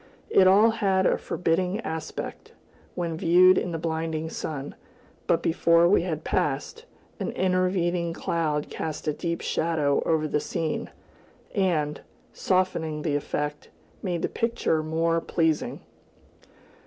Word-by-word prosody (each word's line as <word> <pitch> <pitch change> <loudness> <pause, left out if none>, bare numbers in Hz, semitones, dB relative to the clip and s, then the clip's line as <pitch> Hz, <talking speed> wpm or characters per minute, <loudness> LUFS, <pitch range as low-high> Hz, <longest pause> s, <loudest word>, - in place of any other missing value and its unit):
It 185 - +6
all 210 +4 +6
had 195 -4 +1
a - - +4
forbidding 180 +3 -1
aspect, 160 -5 -6 0.4
when 170 -2 -2
viewed 180 +3 +6
in 180 - -1
the 165 - -2
blinding 160 0 -3
sun; 145 -2 -5 0.5
but - - +2
before 170 +1 +4
we 190 - +4
had 160 -3 -3
passed, 145 - -2 0.3
an - - -2
intervening 180 -2 +1
cloud 155 -3 -2
cast 155 0 -5
a 150 - +2
deep 170 +2 -3
shadow 155 -4 +1
over 155 -1 +1
the 150 - 0
scene, 160 +1 -3 0.6
and, 160 -7 0 0.3
softening 165 -5 0
the 150 -4 0
effect, 150 0 -3 0.3
made 175 -4 -2
the - - +2
picture 230 -9 0
more 165 +1 0
pleasing. 160 -2 0
165 Hz, 130 wpm, -26 LUFS, 155-185 Hz, 0.6 s, It